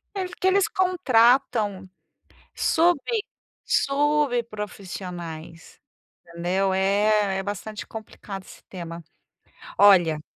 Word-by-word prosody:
É, 385 - -2
porque 360 +1 -4
eles 395 +1 +3
contratam 245 - +2 0.7
sub 345 0 +3 0.7
sub 285 -3 +1
profissionais, 180 -6 -8 0.5
entendeu. 180 +3 -1
É 200 +1 +2
é - - -4
bastante 205 +1 -6
complicado 205 -3 -9
esse - - -15
tema. 170 -2 -8 0.7
Olha 175 -6 +5
205 Hz, 85 wpm, -24 LUFS, 185-270 Hz, 0.7 s, Olha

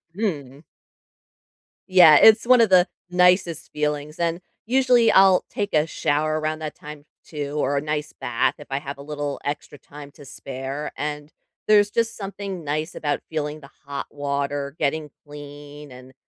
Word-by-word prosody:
Mhm. 145 - -4 1.3
Yeah, 175 -5 +8
it's 220 +6 +6
one 250 0 +6
of 225 - +4
the 185 -1 +5 0.2
nicest 180 -2 +2
feelings, 150 +1 -3
and 170 +1 -1 0.2
usually, 250 -1 +3
I'll 190 -1 +5
take 205 -1 -4
a 155 +1 +2
shower 155 +1 -1
around 155 0 -3
that 155 -1 -6
time 150 -1 -11 0.2
too 145 -2 -6
or 145 -1 0
a - - 0
nice 150 0 -4
bath 115 -1 -1
if 145 - -13
I 135 0 -2
have 140 -1 -7
a - - -11
little 145 0 -5
extra 145 0 -5
time 145 0 -13
to 145 - -15
spare 135 +2 -6
and 150 0 -5 0.4
there's 205 -1 +5
just 230 +1 0
something 195 -3 -6
nice 155 +3 -3
about 145 -1 -2
feeling 155 -1 -4
the 140 - -15 0.2
hot 140 0 -5
water, 140 0 -3
getting 150 0 -1 0.2
clean, 145 0 -11
and 125 +1 -14
150 Hz, 160 wpm, -23 LUFS, 145-180 Hz, 1.3 s, Yeah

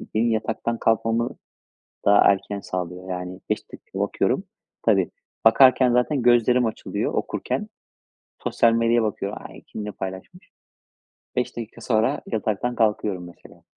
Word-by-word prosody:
benim 115 +2 +2
yataktan 110 +1 -1
kalkmamı 115 +1 +1 0.8
daha 100 0 +6
erken 100 +1 -4
sağlıyor 90 0 -5
yani 90 +1 -5
5 - - -2
dakika - - -10
bakıyorum. - - 0 0.4
Tabii - - +3 0.3
bakarken 130 +2 +6
zaten 125 +3 +2
gözlerim 120 +1 +4
açılıyor, 110 - -3
okurken. - - -2 0.8
Sosyal 115 - +3
medyaya 115 0 +3
bakıyorum. 105 -1 -3
Ay, - - -13
kim 105 - -7
ne 105 - -4
paylaşmış? 95 - -8 0.9
5 125 - -1
dakika 115 0 -7
sonra 115 +4 +1
yataktan 110 +2 -1
kalkıyorum 105 -5 0
mesela. 85 - -16
115 Hz, 125 wpm, -24 LUFS, 100-120 Hz, 0.9 s, daha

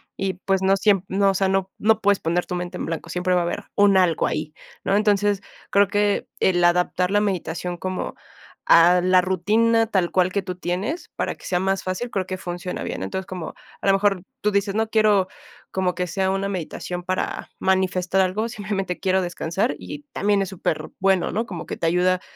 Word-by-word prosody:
Y 190 -2 -2
pues 195 -1 +2
no 195 +1 +3
siem 195 -2 +3 0.2
o 195 -1 +4
sea, 190 0 +1
no, 190 0 0
no 220 0 +3
puedes 200 -1 +3
poner 170 +2 0
tu 180 - -4
mente 175 0 -4
en - - -4
blanco, 165 0 -5
siempre 180 +1 0
va 180 - +3
a - - 0
haber 170 - -3
un 200 -1 +5
algo 175 -4 +3
ahí, 155 0 -3 0.3
¿no? 195 - +2
Entonces, 205 -1 +2 0.3
creo 200 0 +4
que 205 0 +1
el 175 -2 +2
adaptar 180 +1 +2
la 205 - +4
meditación 180 -3 -2
como 185 +1 -4 0.5
a 175 +2 +6
la 185 0 +5
rutina 220 +5 +2
tal 185 -5 0
cual 185 0 +2
que 200 - 0
tú 180 -1 -5
tienes, 185 - -3
para - - -1
que - - -20
sea 180 -1 0
más 195 +1 0
fácil, 185 +6 -3
creo 190 -2 -1
que 185 0 -4
funciona 175 0 -5
bien. - - -4
Entonces, 190 - -4
como 180 -4 -6 0.3
a - - -2
lo - - +7
mejor 195 -2 +2 0.2
tú 210 - +1
dices: 200 0 0
"No 220 0 +1
quiero 210 -4 +3 0.4
como 185 -1 0
que 180 0 -2
sea 190 +2 0
una 195 +1 -1
meditación 180 0 -5
para 185 +1 -3
manifestar 190 0 +1
algo, 200 +5 0
simplemente 205 -5 -3
quiero 190 -1 +2
descansar", 175 +5 -1
y 295 -1 -8
también 205 0 +2
es 195 - -1
super 175 -4 -3
bueno, 190 -1 +2
¿no? 225 +4 -1
Como 180 -6 -7
que - - -5
te 165 - -1
ayuda 180 +2 +2
190 Hz, 205 wpm, -23 LUFS, 180-200 Hz, 0.5 s, lo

